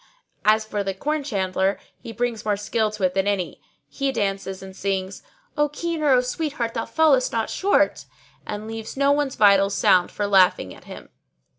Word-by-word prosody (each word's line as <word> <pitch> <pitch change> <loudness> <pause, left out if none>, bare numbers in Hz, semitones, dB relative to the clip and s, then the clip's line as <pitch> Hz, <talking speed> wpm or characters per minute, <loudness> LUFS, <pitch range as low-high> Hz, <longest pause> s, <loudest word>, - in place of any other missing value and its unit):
As 215 +1 +3
for 205 -1 -3
the 195 -1 -3
corn 300 +8 -2
chandler 190 -5 -1 0.2
he 230 - -10
brings 230 0 -2
more 210 -1 0
skill 215 +1 0
to 215 -2 -6
it 180 -1 +2
than 195 +1 0
any; 195 -3 -2 0.3
he 275 -1 -2
dances 195 -4 -3
and 190 0 -10
sings, 190 -1 -3 0.3
'O 295 -1 +1
Keener,[FN#623] 305 -3 +1
O - - +4
sweetheart, 250 -3 -3
thou 230 - -3
fallest 290 -6 +3
not 225 -3 -2
short' 400 +2 +1 0.4
and 210 0 -6
he 225 +1 -6
leaves 225 +4 -8
no 280 0 +3
one's 285 -2 0
vitals 200 -1 +4
sound 180 -1 +3
for 205 - -3
laughing 185 - +3
at - - -16
him. - - -11
215 Hz, 185 wpm, -23 LUFS, 195-270 Hz, 0.4 s, O